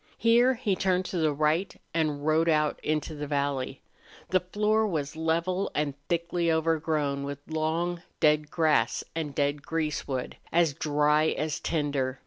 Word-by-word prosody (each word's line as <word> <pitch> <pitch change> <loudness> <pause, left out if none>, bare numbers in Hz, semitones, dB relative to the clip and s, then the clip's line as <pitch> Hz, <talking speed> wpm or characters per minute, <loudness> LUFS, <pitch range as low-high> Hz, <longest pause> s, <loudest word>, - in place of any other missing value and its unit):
Here 240 +3 +4
he 220 -5 0
turned 185 -1 +1
to 180 - -3
the 155 -2 +2
right 155 +6 0
and 150 -3 0
rode 160 +2 +3
out 150 -1 +2
into 155 +1 -1
the 150 -1 -5
valley. 140 -2 -2 0.5
The 185 - +4
floor 210 +4 +1
was 150 -5 -3
level 170 +4 0
and 150 -1 0 0.2
thickly 170 0 0
overgrown 155 -3 0
with 140 0 -4
long, 165 +2 -1 0.2
dead 150 -1 +3
grass 150 -9 +2
and 150 -4 -3
dead 145 0 0
greasewood, 150 -5 -3
as 165 -3 +3
dry 150 0 +2
as 155 -1 -1
tinder. 140 -4 -1
155 Hz, 145 wpm, -28 LUFS, 145-170 Hz, 0.5 s, Here